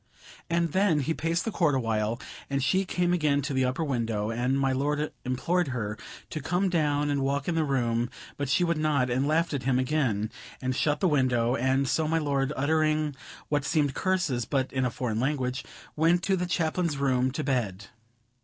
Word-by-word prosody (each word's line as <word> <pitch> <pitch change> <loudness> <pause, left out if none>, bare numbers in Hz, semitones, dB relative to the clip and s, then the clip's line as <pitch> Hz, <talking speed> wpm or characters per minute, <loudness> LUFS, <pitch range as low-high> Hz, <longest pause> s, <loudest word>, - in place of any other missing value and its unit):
And 170 -1 +1
then 185 -5 +3
he 160 +5 0
paced 165 +2 -1
the 225 - -1
court 165 -8 +2
awhile, 115 -2 0 0.3
and 140 -1 0
she 190 +7 +2
came 180 -1 0
again 150 -4 +2
to 140 - -2
the 130 -1 +2
upper 130 +6 -1
window; 115 -6 -1
and 125 +4 0
my 135 -1 +2
lord 145 +3 0
implored 160 +7 0
her 110 -6 -3 0.4
to 155 - -4
come 180 +7 +1
down 145 -4 +1
and 140 -1 0
walk 140 +1 -1
in 175 - +1
the 165 -1 +1
room; 120 -4 0 0.3
but 140 -2 -3
she 155 +5 +3
would 170 -2 +1
not, 145 -5 +1
and 130 +3 +1
laughed 160 +2 +1
at 140 - -1
him 130 0 +1
again, 130 -6 0 0.3
and 130 -1 -2
shut 150 +1 +1
the 190 - +4
window; 125 -5 +2
and 130 +2 +1
so 155 +4 +1
my 165 +1 +1
lord, 140 -3 0
uttering 155 0 +1 0.3
what 145 -1 +1
seemed 145 -1 +1
curses, 180 -10 0
but 130 +2 -1
in 130 -1 +1
a - - +1
foreign 115 -2 -2
language, 130 -1 -1 0.3
went 170 +3 +3
to 190 +2 +2
the 180 -1 -2
Chaplain's 170 -2 0
room 130 -2 +2
to 130 - -3
bed. 105 -8 -2
140 Hz, 200 wpm, -27 LUFS, 130-160 Hz, 0.4 s, the